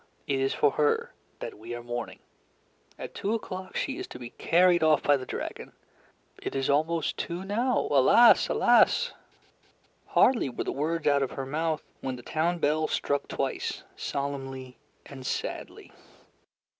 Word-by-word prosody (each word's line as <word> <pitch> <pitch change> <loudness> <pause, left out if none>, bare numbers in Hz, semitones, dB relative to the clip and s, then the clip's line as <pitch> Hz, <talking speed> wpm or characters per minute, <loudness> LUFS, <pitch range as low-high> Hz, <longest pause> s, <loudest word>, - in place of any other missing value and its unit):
It 140 -3 0
is 135 0 +1
for 145 - +3
her 150 +1 +1 0.3
that - - -7
we 115 +2 -6
are 120 - -7
mourning. 120 -1 -5 0.8
At - - -7
two 210 +3 -1
o'clock 185 -4 -6
she 275 +4 -2
is 375 - -5
to - - -9
be 120 -1 -9
carried 175 0 +3
off 155 -1 +4
by 145 - +5
the 130 -2 -5
dragon. - - -6 0.7
It - - -5
is 135 +1 +1
almost 160 +3 0
two 175 +3 -4
now. 235 +6 +1
Alas! 185 - +6
Alas!" 485 +1 +4 0.9
Hardly 240 - +3
were 125 - -4
the - - -3
words 160 +3 -2
out 140 -1 +4
of 135 - -2
her 135 - -4
mouth, 155 +3 -1 0.2
when 130 -1 -4
the 125 - -11
town 170 +6 0
bell 155 0 +1
struck 140 0 -1
twice, - - -3
solemnly 135 -2 -5 0.3
and 135 -2 -10
sadly. - - -5
150 Hz, 155 wpm, -28 LUFS, 135-175 Hz, 0.9 s, Alas